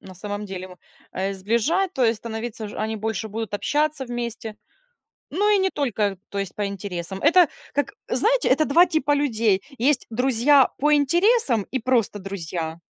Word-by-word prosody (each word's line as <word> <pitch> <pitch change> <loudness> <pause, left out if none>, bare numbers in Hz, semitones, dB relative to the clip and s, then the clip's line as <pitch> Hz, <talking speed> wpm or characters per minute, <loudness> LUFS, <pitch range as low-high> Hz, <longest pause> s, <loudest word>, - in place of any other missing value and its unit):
на 185 - -12
самом 205 +2 -5
деле, 185 -1 -8 0.4
э, 195 +1 -2
сближать, 235 - 0
то 265 - -1
есть 225 0 +2
становиться 225 -1 -6
ж - - -10
они 220 +1 -2
больше 220 0 -3
будут 220 0 -5
общаться 295 +4 0
вместе, 235 -2 -5 0.8
но 410 +7 +1
и 415 - +4
не 380 0 +1
только, 215 - -1
то 200 - -5
есть 195 -2 -4
по 205 - -1
интересам. 190 -2 -5
Это 335 +1 +6 0.2
как, 285 - -1 0.2
знаете, - - +2
это 310 - +3
2 340 +6 +5
типа 310 -3 +1
людей. 225 -9 +1 0.2
Есть 265 +2 +1
друзья 260 +3 +4
по 300 +2 +2
интересам, 335 - +3
и 265 - 0
просто 235 -4 0
друзья. 170 -4 -5
230 Hz, 165 wpm, -23 LUFS, 200-290 Hz, 0.8 s, Это